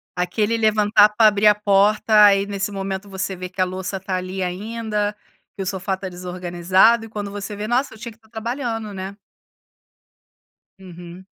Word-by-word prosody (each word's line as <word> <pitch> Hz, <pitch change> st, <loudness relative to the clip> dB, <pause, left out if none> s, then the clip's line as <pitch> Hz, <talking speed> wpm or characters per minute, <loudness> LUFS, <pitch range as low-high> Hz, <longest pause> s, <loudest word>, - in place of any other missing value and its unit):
Aquele 205 Hz, +5 st, 0 dB
levantar 210 Hz, -1 st, +4 dB
para 215 Hz, +1 st, +4 dB
abrir 210 Hz, 0 st, +3 dB
a 210 Hz, -, +6 dB
porta. 210 Hz, +1 st, +4 dB
Aí 200 Hz, -1 st, +4 dB
nesse 200 Hz, 0 st, -3 dB
momento 195 Hz, 0 st, -5 dB
você 190 Hz, 0 st, -4 dB
vê 180 Hz, 0 st, -7 dB
que 185 Hz, +1 st, -4 dB
a -, -, +4 dB
louça 185 Hz, +1 st, -5 dB
tá 190 Hz, 0 st, -4 dB
ali 185 Hz, +1 st, -5 dB
ainda, 210 Hz, +2 st, -3 dB, 0.4 s
que 200 Hz, -, -6 dB
o -, -, -3 dB
sofá 190 Hz, 0 st, -2 dB
tá 190 Hz, 0 st, -7 dB
desorganizado 180 Hz, +5 st, +1 dB
e 225 Hz, -, -12 dB
quando 205 Hz, -2 st, -5 dB
você 205 Hz, +1 st, -6 dB
vê: 210 Hz, +1 st, -5 dB
"Nossa, 250 Hz, +4 st, 0 dB
eu -, -, -13 dB
tinha 235 Hz, +2 st, -8 dB
que 220 Hz, -, -19 dB
estar 220 Hz, -1 st, -27 dB
trabalhando, 225 Hz, -1 st, -4 dB
né". 190 Hz, +1 st, -6 dB, 1.6 s
Uhum. 180 Hz, -1 st, -12 dB
200 Hz, 180 wpm, -21 LUFS, 185-215 Hz, 1.6 s, a